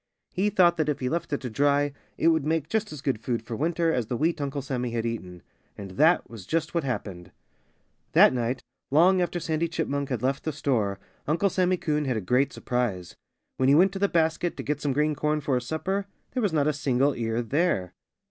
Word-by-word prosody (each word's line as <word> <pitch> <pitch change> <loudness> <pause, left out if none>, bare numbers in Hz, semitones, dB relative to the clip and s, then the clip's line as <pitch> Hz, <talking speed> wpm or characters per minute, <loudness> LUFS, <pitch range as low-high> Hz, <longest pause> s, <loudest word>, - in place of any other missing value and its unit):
He 195 +3 +1
thought 175 -3 +4
that 155 -2 +1
if 150 - -1
he 125 - -1
left 170 +3 -2
it 145 - -1
to 125 - -4
dry 145 +3 +2 0.2
it 165 - +4
would 160 -3 +2
make 155 0 0
just 220 +3 -1
as 150 -3 -8
good 130 -6 -1
food 120 -2 -2
for 115 0 -5
winter 165 +3 +1
as 120 -4 -1
the 120 - -2
wheat 160 +2 0
Uncle 140 -1 -3
Sammy 125 -2 -2
had 115 -1 -2
eaten. 90 -7 -5 0.3
And 100 -2 -8
that 160 - +3
was 110 -6 -11
just 160 -1 -1
what 170 -2 0
happened. 100 -9 -5 0.8
That - - +7
night, 125 +1 -2 0.3
long 180 +6 +5
after 175 0 -1
Sandy 160 0 -1
Chipmunk 140 -4 -2
had 125 -3 -3
left 135 +1 0
the 155 - -2
store, 115 -9 0 0.3
Uncle 170 +6 +2
Sammy 185 0 +2
Coon 150 -3 -1
had 130 -4 0
a - - -2
great 125 +8 +2
surprise. 120 -8 -2 0.4
When 130 0 +3
he 140 - +6
went 185 +4 +5
to 195 - -5
the 200 0 +2
basket, 165 +1 0
to - - -4
get 145 0 -2
some 145 - 0
green 150 +3 +1
corn 150 +1 0
for 140 -2 -2
his 125 -1 -1
supper, 190 +6 -2 0.2
there 255 - -1
was 205 -5 +1
not 150 -3 +2
a 150 - +2
single 140 -1 +1
ear 115 0 -2
there. 115 - 0
145 Hz, 225 wpm, -26 LUFS, 125-165 Hz, 0.8 s, That